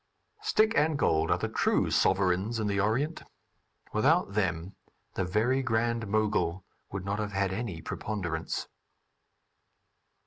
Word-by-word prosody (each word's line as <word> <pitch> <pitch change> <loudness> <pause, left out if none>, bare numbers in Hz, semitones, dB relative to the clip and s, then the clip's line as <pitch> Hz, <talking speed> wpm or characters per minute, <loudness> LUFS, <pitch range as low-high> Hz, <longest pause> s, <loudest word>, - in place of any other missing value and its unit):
Stick 225 - +3
and 150 0 +3
gold 80 - +2
are - - +3
the - - -2
true - - +1
sovereigns 95 +4 +2
in 110 - -1
the 100 -1 0
Orient; 125 +11 0 0.7
without 140 - +3
them 90 -2 -1 0.4
the 95 - -1
Very 110 +9 +1
Grand 115 -2 0
Mogul 100 -4 0 0.3
would 95 -1 -5
not 100 +1 -2
have 105 -1 -3
had 95 -1 0
any 100 -6 -4
preponderance. 85 -6 -3
105 Hz, 130 wpm, -29 LUFS, 95-120 Hz, 0.7 s, Stick